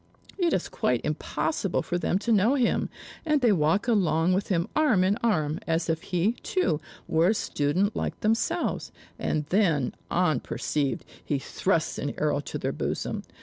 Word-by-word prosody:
It 345 Hz, -2 st, +2 dB
is 185 Hz, -, 0 dB
quite 125 Hz, -1 st, 0 dB
impossible 155 Hz, +4 st, -1 dB
for 175 Hz, -1 st, -2 dB
them 175 Hz, -, +1 dB
to 235 Hz, -, +1 dB
know 220 Hz, +5 st, +4 dB
him, 255 Hz, -4 st, +1 dB, 0.3 s
and 305 Hz, -2 st, +2 dB
they 245 Hz, -4 st, +4 dB
walk 170 Hz, +4 st, +2 dB
along 180 Hz, -6 st, +3 dB
with 195 Hz, +2 st, 0 dB
him 170 Hz, -3 st, 0 dB
arm 270 Hz, -12 st, +4 dB
in 190 Hz, +2 st, +3 dB
arm, 160 Hz, -11 st, 0 dB
as 165 Hz, 0 st, +1 dB
if 160 Hz, 0 st, -2 dB
he, 180 Hz, +4 st, +1 dB
too, 165 Hz, -, 0 dB, 0.3 s
were 160 Hz, +2 st, +3 dB
a 210 Hz, -, +4 dB
student 180 Hz, +4 st, 0 dB
like -, -, -3 dB
themselves; 225 Hz, +11 st, 0 dB, 0.3 s
and 150 Hz, -1 st, -1 dB
then, 170 Hz, -, +2 dB, 0.2 s
unperceived, 150 Hz, -3 st, 0 dB, 0.2 s
he 145 Hz, -, 0 dB
thrusts 135 Hz, -, -1 dB
an -, -, -3 dB
arrow -, -, +1 dB
to -, -, -5 dB
their -, -, -2 dB
bosom. -, -, -3 dB
180 Hz, 165 wpm, -27 LUFS, 155-220 Hz, 0.3 s, know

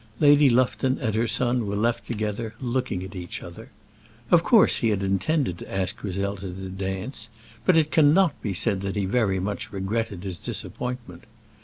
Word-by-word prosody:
Lady 145 Hz, -1 st, +6 dB
Lufton 130 Hz, +1 st, +2 dB
and 115 Hz, -6 st, -2 dB
her 115 Hz, +2 st, +1 dB
son 120 Hz, 0 st, +1 dB
were 100 Hz, -, -2 dB
left 115 Hz, +3 st, 0 dB
together 110 Hz, 0 st, -3 dB
looking 125 Hz, -7 st, -2 dB
at 95 Hz, +2 st, -8 dB
each 90 Hz, -3 st, -6 dB
other. 110 Hz, +9 st, -10 dB, 0.6 s
Of 175 Hz, -, +7 dB
course 220 Hz, +4 st, +5 dB
he 115 Hz, -, +1 dB
had 100 Hz, -2 st, 0 dB
intended 95 Hz, -, 0 dB
to -, -, -10 dB
ask 95 Hz, -1 st, -2 dB
Griselda 100 Hz, 0 st, -3 dB
to 95 Hz, +1 st, -7 dB
dance, 95 Hz, +5 st, -5 dB, 0.4 s
but 185 Hz, -3 st, +5 dB
it 155 Hz, -1 st, +2 dB
cannot 160 Hz, +2 st, +4 dB
be 100 Hz, -4 st, -2 dB
said 100 Hz, 0 st, 0 dB
that 100 Hz, 0 st, -3 dB
he 100 Hz, -2 st, 0 dB
very 100 Hz, -2 st, +1 dB
much 100 Hz, +2 st, -4 dB
regretted 100 Hz, -1 st, -3 dB
his 95 Hz, -4 st, -5 dB
disappointment. 120 Hz, -9 st, -6 dB
110 Hz, 175 wpm, -25 LUFS, 95-125 Hz, 0.6 s, Of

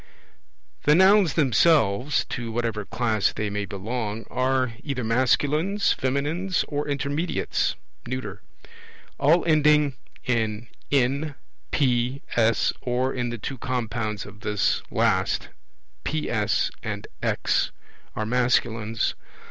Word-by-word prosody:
The 150 Hz, -, +6 dB
Nouns 190 Hz, -3 st, +5 dB
themselves 140 Hz, -4 st, +3 dB
(to 120 Hz, -2 st, -4 dB
whatever 115 Hz, -3 st, -2 dB
class 110 Hz, -3 st, +1 dB
they 105 Hz, -2 st, -3 dB
may 100 Hz, 0 st, -2 dB
belong) 110 Hz, +2 st, -4 dB
are 130 Hz, -1 st, +1 dB
either 135 Hz, -4 st, -3 dB
masculines, 145 Hz, -, +2 dB
feminines, 150 Hz, +8 st, -1 dB
or 145 Hz, 0 st, -2 dB
intermediates 145 Hz, +4 st, -1 dB, 0.3 s
(neuter). 105 Hz, -6 st, -5 dB, 0.8 s
All 155 Hz, +5 st, +4 dB
ending 150 Hz, -3 st, +4 dB, 0.3 s
in 110 Hz, -2 st, -1 dB, 0.2 s
N, 140 Hz, +2 st, +1 dB, 0.3 s
P, 125 Hz, -1 st, +1 dB
S, 115 Hz, -1 st, +3 dB
or 125 Hz, +1 st, 0 dB
in 120 Hz, -1 st, -2 dB
the 120 Hz, -, -4 dB
two 130 Hz, +4 st, -6 dB
compounds 115 Hz, -5 st, -2 dB
of 100 Hz, +1 st, -12 dB
this 105 Hz, -3 st, 0 dB
last, -, -, +1 dB, 0.5 s
PS 120 Hz, -, 0 dB
and -, -, -4 dB, 0.2 s
X, -, -, +1 dB, 0.5 s
are 110 Hz, -, -2 dB
masculines. 115 Hz, -2 st, +1 dB
125 Hz, 110 wpm, -25 LUFS, 110-145 Hz, 0.8 s, The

